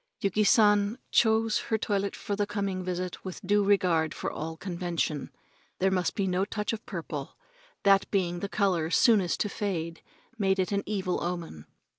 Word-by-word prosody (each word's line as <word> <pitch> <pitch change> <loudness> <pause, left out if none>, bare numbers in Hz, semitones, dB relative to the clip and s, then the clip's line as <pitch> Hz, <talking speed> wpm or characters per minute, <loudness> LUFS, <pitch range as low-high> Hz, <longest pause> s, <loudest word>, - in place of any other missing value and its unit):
Yuki 200 +2 +1
San 210 0 +4
chose 220 -1 +3
her 220 - -1
toilet 200 -2 -1
for 205 - -3
the 205 0 0
coming 200 -3 -2
visit 180 0 -4
with 185 -2 -6
due 205 +2 +3
regard 180 -6 +2
for - - -3
all 160 +1 -5
convention. 170 -4 -2 0.5
There 190 +1 +2
must 180 -2 0
be 200 - 0
no 185 0 +1
touch 210 +2 -2
of 225 - -5
purple - - -6 0.5
that 195 -1 +4
being 175 -3 0
the 200 - -4
color 185 -7 +1
soonest 195 - +3
to 210 - 0
fade 170 -6 -3 0.4
made 195 -1 +2
it 185 0 0
an 200 0 +1
evil 190 -3 -1
omen. 170 - -5
195 Hz, 170 wpm, -28 LUFS, 175-205 Hz, 0.5 s, San